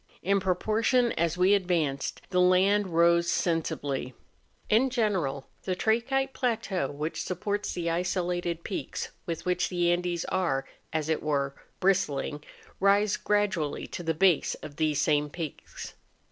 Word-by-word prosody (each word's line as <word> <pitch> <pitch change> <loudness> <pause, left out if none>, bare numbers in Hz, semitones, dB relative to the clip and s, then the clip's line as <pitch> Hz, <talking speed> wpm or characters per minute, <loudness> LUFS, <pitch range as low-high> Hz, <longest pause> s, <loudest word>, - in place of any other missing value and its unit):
In 195 +2 +3
proportion 220 +6 +2
as 170 +1 0
we 185 +2 +5
advanced, 170 -8 0
the 180 -1 +3
land 190 +3 +4
rose 170 0 +3
sensibly. 145 -6 -1 0.5
In 240 +5 +3
general 190 - 0 0.2
the 185 - -2
trachytic 240 +7 +1
plateau 220 - -1
which 150 +3 -4
supports 205 +3 -2
the 170 -1 -3
isolated 175 -1 -1
peaks 195 - -4 0.2
with 165 -2 -4
which 180 0 +1
the 175 -1 +2
Andes 175 -1 -1
are, 165 -8 0 0.3
as 155 -1 -1
it 160 -1 0
were, 140 -2 0 0.3
bristling, 150 -6 0 0.4
rise 200 +1 +4
gradually 195 -8 0
to - - -6
the 165 -2 -1
base 180 -1 +3
of 145 - -9
these 155 -2 +1
same 150 -1 +2
peaks. 160 -1 -7
180 Hz, 135 wpm, -28 LUFS, 155-200 Hz, 0.5 s, we